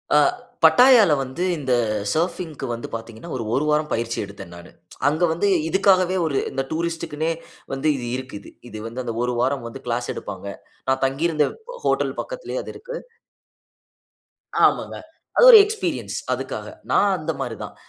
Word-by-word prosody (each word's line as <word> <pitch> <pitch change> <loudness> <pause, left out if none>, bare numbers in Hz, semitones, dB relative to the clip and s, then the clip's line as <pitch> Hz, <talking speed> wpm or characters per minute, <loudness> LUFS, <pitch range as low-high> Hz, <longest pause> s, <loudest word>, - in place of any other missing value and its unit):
ஆ - - +7 0.5
பட்டாயால 245 -7 +7
வந்து 135 +6 -4
இந்த 135 -4 -1 0.4
சர்ஃபிங்க்கு 160 -3 -2
வந்து 115 - -5
பாத்தீங்கன்னா, 115 +6 -9
ஒரு 120 - -3
1 140 +5 +1
வாரம் 150 0 +1
பயிற்சி 115 0 -2
எடுத்தேன் 100 -3 -11
நானு. 85 0 -12 0.4
அங்க 155 +4 +1
வந்து 170 +5 0 0.2
இதுக்காகவே 185 0 +3
ஒரு 145 -4 0
இந்த 135 0 -1
டூரிஸ்ட்க்குன்னே 165 -1 -2 0.4
வந்து 135 +3 -1
இது 125 - -5
இருக்குது. 130 -6 -8 0.2
இது 110 - -8
வந்து 120 +3 -5
அந்த 115 - -4
1 125 0 0
வாரம் 130 0 0
வந்து 125 +3 -8
கிளாஸ் 120 +1 -2
எடுப்பாங்க. 100 -1 -7 0.4
நான் 130 0 +1
தங்கி 135 +5 -1
இருந்த 155 -3 +2 0.4
ஹோட்டல் - - +1
பக்கத்திலயே - - -5
அது - - -7
இருக்கு. - - -8 1.7
ஆமாங்க. - - 0 0.4
அது - - +6
ஒரு 455 - +12
எக்ஸ்பீரியன்ஸ் 430 +1 -3 0.2
அதுக்காக. - - -5 0.2
நான் 200 -1 +4
அந்த 155 +1 -2
மாரி 120 -4 -3
தான். - - -9
140 Hz, 155 wpm, -22 LUFS, 120-170 Hz, 1.7 s, ஒரு